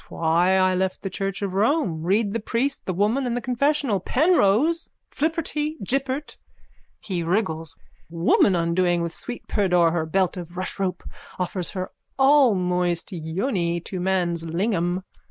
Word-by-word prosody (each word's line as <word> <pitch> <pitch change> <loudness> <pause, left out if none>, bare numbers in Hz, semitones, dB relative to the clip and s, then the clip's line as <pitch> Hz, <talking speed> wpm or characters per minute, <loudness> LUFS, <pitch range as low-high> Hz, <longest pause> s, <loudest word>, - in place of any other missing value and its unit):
Why 170 +3 +2
I 185 0 +3
left 185 0 -1
the 195 - -3
church 195 +1 -3
of 195 -2 -2
Rome. 200 - +1
Read 200 +4 +1
the 230 - -1
Priest, 250 +6 -2
the - - +1
Woman 225 +8 +1
and 240 0 -1
the - - 0
Confessional. 255 -2 +1
Penrose. 310 - +2 0.2
Flipperty 310 0 -1
Jippert. 270 +4 -2 0.6
(He 185 -5 -3
wriggles.) 165 -3 -1 0.3
Woman, 170 +3 +3
undoing 170 +1 +1
with 170 0 -4
sweet 245 -1 -8
pudor 180 -5 +3
her 160 -1 -1
belt 190 +2 +1
of 175 0 -8
rushrope, 185 -1 -3 0.3
offers 180 -1 -2
her 185 -1 -5 0.3
allmoist 185 - +3
yoni 170 - -1
to 185 +2 -6
man's 175 -2 0
lingam. 175 +1 -1
190 Hz, 140 wpm, -24 LUFS, 175-240 Hz, 0.6 s, I